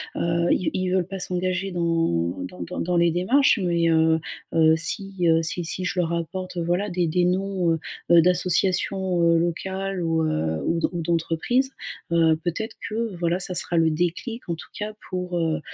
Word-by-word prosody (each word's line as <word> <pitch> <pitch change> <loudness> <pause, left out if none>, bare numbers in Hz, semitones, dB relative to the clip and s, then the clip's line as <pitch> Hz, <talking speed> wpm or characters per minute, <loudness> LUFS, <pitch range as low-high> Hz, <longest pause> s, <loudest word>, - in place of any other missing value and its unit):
heu, 170 0 0
ils 185 - +1
v - - 0
ils 185 0 -1
veulent 185 -1 +1
pas 195 - -6
s'engager 185 +1 -1
dans 165 - 0
dans 90 0 -12
dans 85 - -5
dans 175 0 0
les 170 0 +4
démarches, 230 - +3
mais 170 -1 +2
heu 160 0 +3 0.3
heu, 160 -1 +5
si, 195 +4 0
heu, 165 0 +4
si 170 +1 -1
si 185 +3 -2
je 180 - -2
leur 170 -1 0
apporte, 180 +2 -4
heu, - - 0
voilà 175 +5 0
des 175 -1 0
des 175 +2 +1
noms, 185 -1 0
heu 165 - 0 0.3
heu, 170 -1 +8
d'associations, 180 +1 +1
heu, 165 0 +4
locales 190 +2 -2
ou 165 -1 +1
heu, 80 - -1
ou 165 - +1
d'en - - +1
ou 175 -2 -3
d'entreprises, 170 +11 0 0.4
heu, 165 -1 +4
peut-être 200 +6 -3
que, 225 -2 -3
voilà, 170 +1 0
ça 185 -1 0
sera 175 - +2
le 165 -1 +4
déclic, 175 +9 -3
en 170 - 0
tout - - -11
cas, 210 0 -4 0.2
pour, 180 -1 -3
heu 160 -2 0
175 Hz, 200 wpm, -24 LUFS, 165-185 Hz, 0.4 s, heu